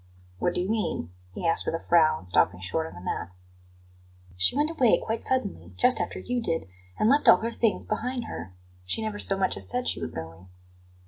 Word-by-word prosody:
"What 175 - 0
do - - 0
you 180 - -2
mean?" 210 - -2 0.2
he - - -5
asked 165 0 +1
with - - 0
a 165 - -6
frown, 155 - +4
stopping 90 0 +3
short 160 - -2
on - - -11
the 90 - -10
mat. 90 - -3 1.1
"She 95 - +3
went 300 +2 +2
away 255 -9 +4
quite 225 +1 -3
suddenly, 255 -7 -2
just 250 +1 +3
after - - -3
you 245 -1 -2
did, 165 - -2 0.3
and 215 - +2
left 285 +5 +3
all - - +9
her 230 +4 -3
things 230 -2 0
behind 245 +2 -2
her. 95 - -7 0.3
She 155 - -2
never 215 -1 -3
so 195 - +3
much 190 -1 0
as - - -3
said 250 0 -2
she - - -1
was 80 0 -3
going." 80 +3 -9
195 Hz, 210 wpm, -27 LUFS, -, 1.1 s, all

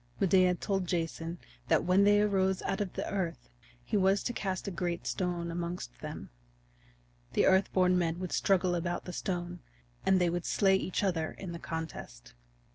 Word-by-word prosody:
Medea 185 -1 +4
told 195 0 -2
Jason 165 0 -2 0.3
that - - +3
when 185 +3 +4
they 205 0 +5
arose 190 -2 +2
out 195 +1 -1
of 195 -3 -3
the - - -3
earth 170 - -3 0.3
he - - -2
was 195 0 +3
to 240 - -2
cast 190 -3 -3
a - - -2
great 175 -1 -3
stone 175 -2 -2
amongst 170 - -5
them. - - -7 1.0
The - - +3
Earth 190 +1 +4
born 180 -1 +3
Men 165 -1 0
would 180 -1 -5
struggle 185 -2 +2
about 175 0 -2
the 180 - -6
stone, 175 -1 -3 0.4
and 190 -1 +4
they 175 -1 +2
would 175 0 -2
slay 195 -2 +4
each 190 +1 -1
other 165 -5 0
in 185 -3 -7
the 170 - -6
contest. 160 - -7
180 Hz, 180 wpm, -31 LUFS, 170-190 Hz, 1.0 s, they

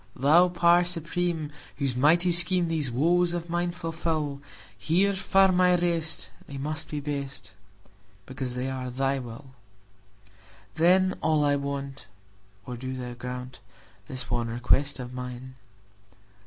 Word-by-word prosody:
Thou 160 +7 +5
Power 175 0 +4
Supreme, 170 -2 -1 0.3
whose 135 -3 -1
mighty 165 +7 +4
schemeThese 170 -4 +3
woes 170 +8 +2
of 170 -1 -4
mine 175 0 0
fulfil, 160 -4 -3 0.3
Here 190 +5 +2
firm 190 -1 +3
I 180 0 +5
rest; 170 -2 -1 0.2
they 140 - -7
must 155 +3 -4
be 150 -3 -3
best, 140 -1 -6 0.7
Because 130 0 -5
they 125 +1 -2
are 130 -1 -4
Thy 135 +2 -1
will! 125 +2 -10 1.2
Then 185 +3 +3
all 155 -2 +2
I 145 0 +3
want—O 100 -7 -8
do 130 +2 -5
Thou 125 -1 -6
grantThis 125 +1 -8
one 120 -1 0
request 125 +5 +1
of 125 -1 -7
mine! 125 0 -7
145 Hz, 125 wpm, -27 LUFS, 125-170 Hz, 1.2 s, Thou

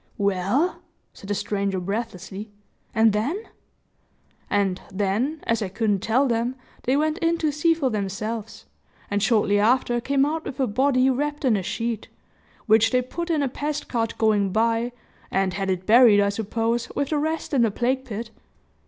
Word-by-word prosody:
"Well?" 200 - 0 0.3
said 195 - -12
the 205 - 0
stranger, 200 -2 -1
breathlessly, 200 +1 -5 0.4
"and 220 -2 +4
then?" 255 - 0 1.1
"And 195 -2 +1
then, 210 +11 -1
as 230 0 0
I 200 - -2
couldn't 205 0 0
tell 235 +8 +2
them 235 +1 0 0.3
they 260 +3 +2
went 310 +3 0
in 335 -1 +1
to 310 -2 0
see 325 +3 +2
for 275 -6 0
themselves, 215 +2 -4 0.5
and 205 0 +1
shortly 205 -2 +3
after 240 +2 +2
came 275 +2 +2
out 315 +2 -2
with 270 - -6
a 265 - +3
body 255 +3 +2
wrapped 295 +2 -2
in 240 -4 +4
a 200 - 0
sheet, 230 +3 -3 0.6
which 225 0 +5
they 250 +2 +2
put 340 +7 -5
in 310 -3 +1
a - - +1
pest 295 +3 -4
cart 225 -2 -1
going 210 -3 +2
by, 230 +3 +1 0.4
and 190 -1 0
had 195 0 -2
it 185 0 -1
buried, 225 -1 +7
I 200 0 +3
suppose, 225 +3 -1
with 280 - -1
the 305 - +1
rest 315 +1 -2
in 265 - +4
the 230 - +4
plague 255 +5 0
pit." 230 -2 -6
230 Hz, 175 wpm, -24 LUFS, 205-270 Hz, 1.1 s, buried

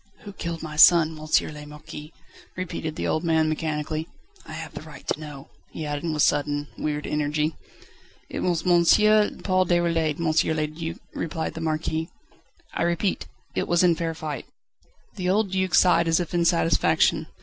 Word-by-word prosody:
"Who 205 - -10
killed 170 -3 -5
my 155 -1 -7
son, 165 0 +7
M. 155 0 0
le 150 0 -9
Marquis?" 150 +1 -10 0.5
repeated 165 -3 -4
the - - -3
old 155 - 0
man 160 -2 +2
mechanically. 155 0 -2 0.4
"I - - -8
have - - -7
the - - -7
right - - -13
to - - -1
know," 150 -3 -9 0.2
he 160 - -6
added 145 +2 -3
with 150 -1 +1
sudden, 145 0 +1
weird 150 -1 -3
energy. 150 +1 -1 0.7
"It - - -5
was 175 -2 0
M. 175 -1 +4 0.6
Paul 185 -1 +2
Déroulède, 165 -3 +1
M. 160 -1 +1
le 155 - +1
Duc," 160 +2 -6 0.2
replied 160 0 -3
the 160 - -7
Marquis. 160 0 -2 0.6
"I - - -3
repeat, 170 +3 0 0.3
it - - -1
was 175 +1 +3
in 175 -1 +5
fair 165 0 -3
fight." 150 -5 -5 0.7
The 180 -1 -1
old 200 0 +1
Duc 190 -1 +1
sighed 170 -2 +5
as 165 +1 +3
if 175 -1 -4
in 170 -1 +2
satisfaction. 85 - +2
160 Hz, 170 wpm, -25 LUFS, 150-170 Hz, 0.7 s, son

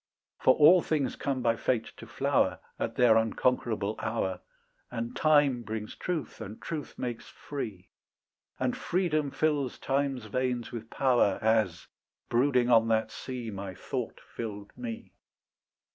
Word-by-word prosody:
For 130 - +5
all 170 +4 +7
things 145 -7 0
come 135 -3 -2
by 115 -1 +3
fate 115 0 -1
to - - -10
flower - - +1 0.2
At - - -2
their 120 -3 +6
unconquerable 110 -2 +1
hour, 95 -5 -1 0.5
And 120 +1 -4
time 145 -5 +4
brings 110 -1 -5
truth, 175 -5 -4
and 105 +3 -7
truth 155 -4 -6
makes 120 -2 -4
free, 110 -10 -6 0.7
And - - 0
freedom 155 -5 0
fills 145 -3 0
time's 135 -3 -1
veins 125 +2 -1
with 115 -1 -7
power, 125 -7 +3
As, 110 -6 +1 0.4
brooding 125 0 +3
on 115 -1 +6
that 110 -1 +1
sea, 125 -4 -5
My 95 -2 -6
thought - - -4
filled 105 -3 -7
me. 120 -2 -6
120 Hz, 135 wpm, -29 LUFS, 110-135 Hz, 0.7 s, all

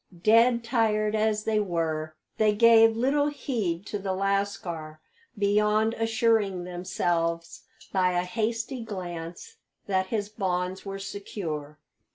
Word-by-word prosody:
Dead 235 +2 +5
tired 215 -3 +1
as 215 -1 +1
they 215 -1 +1
were, 160 -5 -2 0.2
they 215 -1 +3
gave 225 0 +6
little 285 +4 +2
heed 215 - -2
to 205 - -4
the 190 -1 -2
lascar 190 -5 -2 0.4
beyond 210 +2 +2
assuring 225 -5 +1
themselves 175 -2 -2 0.3
by 185 -2 +2
a 175 0 +1
hasty 225 +5 -2
glance 175 -5 -7 0.3
that 190 -1 0
his 205 -1 -2
bonds 185 -3 -2
were 195 -1 -5
secure. 180 -7 -6
200 Hz, 120 wpm, -27 LUFS, 180-225 Hz, 0.4 s, gave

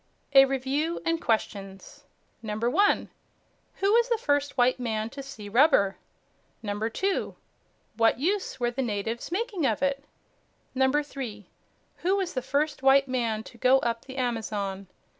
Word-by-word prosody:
A 270 0 +9
REVIEW 270 +5 -1
AND 330 0 0
QUESTIONS 205 +5 -3 0.4
1. 215 -1 -4 1.2
Who 395 +2 +1
was 470 +1 +4
the 470 - +2
first 285 -6 0
white 250 +1 +3
man 220 -2 -2
to 275 - -7
see 230 -6 -9
rubber? 215 -4 +4 0.7
2 220 - -2 0.6
What 225 0 +3
use 370 -2 -1
were 240 -1 0
the 260 +3 -3
natives 225 +3 -3
making 380 - -1
of 220 +4 -1
it? 275 0 0 0.7
3. 265 -6 -1 0.5
Who 375 +3 +1
was 385 -3 -2
the 255 - -1
first 285 +2 -1
white 270 +1 +5
man 230 -4 -1
to 235 - -14
go 255 +3 +5
up 230 -1 -2
the 265 0 -9
Amazon? 210 -6 -2
260 Hz, 140 wpm, -27 LUFS, 225-285 Hz, 1.2 s, A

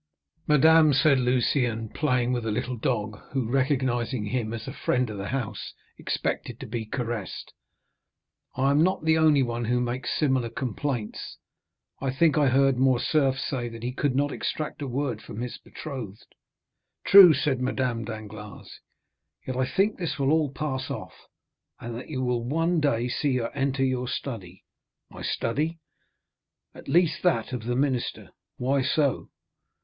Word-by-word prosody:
"Madame," 155 +1 +6
said 140 0 +4
Lucien, 125 -2 +1
playing 125 -3 0
with 120 -2 -1
a 110 - -1
little 125 +3 -2
dog, 110 -4 -2
who, 130 -4 0
recognizing 130 -3 0
him 115 0 -2
as 115 -1 -6
a - - -5
friend 125 -3 0
of 105 - -6
the 100 - -4
house, 130 -4 -4 0.2
expected - - -3
to - - -7
be 115 0 -4
caressed, 115 -4 -4 1.0
"I 135 +1 +2
am 145 +2 +4
not 185 -1 +1
the 160 0 +4
only 150 -4 +5
one 120 -1 -2
who 125 +2 +1
makes 125 +2 -2
similar 130 -5 +1
complaints, 125 -1 -4 0.6
I 135 - -1
think 145 +4 +3
I 150 -2 +4
heard 135 0 +3
Morcerf 135 +1 +2
say 125 -3 -3
that 115 0 -10
he 125 - -2
could 135 0 0
not 145 +1 +1
extract 155 +2 -4
a 140 - -3
word 125 -3 -2
from 105 - -9
his 125 0 -5
betrothed." 120 -9 -8 0.7
"True," 195 -3 +10
said 140 -3 0
Madame 125 -2 -1
Danglars; 110 -1 -9 0.7
"yet 130 - -4
I 130 0 0
think 200 +6 +1
this 170 -3 -2
will 140 0 +1
all 155 -2 +2
pass 135 -2 -3
off, - - -6 0.7
and 120 0 -6
that 125 - -8
you 130 -4 -2
will 125 -2 0
one 165 +6 +1
day 125 -5 +1
see 135 +2 0
her 115 -2 -2
enter 135 -1 0
your 125 -1 -1
study." 110 -9 -6 0.5
"My - - -10
study?" 155 +8 -1 1.0
"At - - -13
least 170 0 +2
that 130 -9 +1
of 120 -3 -4
the 120 +1 -1
minister." 130 -2 -1 0.3
"Why 135 +2 +1
so!" 140 0 0
130 Hz, 160 wpm, -26 LUFS, 120-145 Hz, 1.0 s, True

